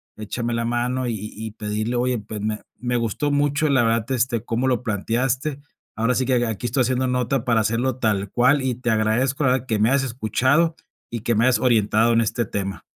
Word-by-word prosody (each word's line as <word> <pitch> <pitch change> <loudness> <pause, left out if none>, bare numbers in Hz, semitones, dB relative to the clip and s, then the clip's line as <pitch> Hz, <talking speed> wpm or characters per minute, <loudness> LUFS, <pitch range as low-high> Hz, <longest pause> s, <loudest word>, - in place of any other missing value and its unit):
échame 115 +3 -4
la 115 0 -1
mano". 120 +2 -1
Y 115 - -1 0.2
y 110 +1 -6
pedirle 110 +2 -3
oye, 125 -1 0
pues 105 +1 -7
me 105 +1 -3 0.2
me 125 0 -2
gustó 120 +5 -1
mucho, 145 +1 +1
la 135 -4 +3
verdad, 115 0 0
este, 120 -2 0
cómo 120 +3 -1
lo 125 -2 +1
planteaste. 125 +6 -1 0.4
Ahora 115 +3 +1
sí 130 - +1
que 125 -2 +2
aquí 115 +1 -4
estoy 125 +3 0
haciendo 130 +1 0
nota 125 0 0
para 115 -2 +2
hacerlo 115 +4 0
tal 105 -5 0
cual 130 +4 +3
y 130 -2 -1
te 120 0 -3
agradezco, 115 +6 +1
la 130 - +4
verdad, 130 -1 0
que 110 -3 0
me 110 +2 +3
hayas 135 +1 +2
escuchado, 130 +7 +1 0.3
y 115 - -4
que 115 +1 0
me 110 - +3
hayas 130 -1 +3
orientado 115 -1 +3
en 115 - +4
este 115 +1 -1
tema. 95 -2 -4
120 Hz, 215 wpm, -22 LUFS, 110-130 Hz, 0.4 s, la